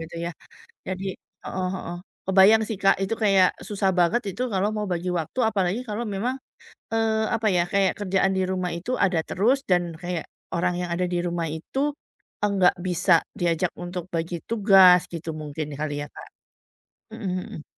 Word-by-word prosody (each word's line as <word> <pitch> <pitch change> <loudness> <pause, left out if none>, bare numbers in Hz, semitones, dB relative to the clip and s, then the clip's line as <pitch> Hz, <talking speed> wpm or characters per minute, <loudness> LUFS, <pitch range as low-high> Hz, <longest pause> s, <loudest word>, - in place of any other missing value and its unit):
gitu 165 +1 -8
ya. 170 - -2 0.6
Jadi 190 +1 -4 0.4
heeh 185 -1 -2
heeh, 180 -2 -6 0.3
kebayang 195 +3 +6
sih 220 - -3
Kak 195 - +6
itu 195 - -1
kayak 195 -3 +5 0.2
susah 200 -2 +1
banget 205 +8 +3
itu 195 - -6
kalau 190 +2 +2
mau 210 -1 -2
bagi 175 +1 -2
waktu, 165 - -5
apalagi 195 0 0
kalau 215 +3 -2
memang, 245 +6 -1 0.6
eee, 225 -1 +2 0.2
apa 220 -1 -2
ya, - - +4
kayak 195 -1 +3
kerjaan 195 -1 +1
di - - +2
rumah 185 -1 -1
itu 185 +9 -6
ada 185 -4 +2
terus 235 +9 +2
dan 175 -1 +4 0.2
kayak 175 -3 -3 0.3
orang 175 +1 +1
yang 175 -1 -3
ada 180 +1 0
di 175 - +1
rumah 170 -1 -2
itu, 265 +11 -5 0.7
enggak 190 -3 +4
bisa 180 0 +2 0.3
diajak 170 0 +1
untuk 175 0 -4
bagi 165 +1 -2
tugas 195 -5 +7
gitu 165 0 -6
mungkin 150 +1 -5
kali 155 -1 -2
ya, - - -9
Kak. - - -10 0.9
Mhm 225 -3 -5 0.2
mhm. 155 - -9
185 Hz, 170 wpm, -25 LUFS, 175-200 Hz, 0.9 s, tugas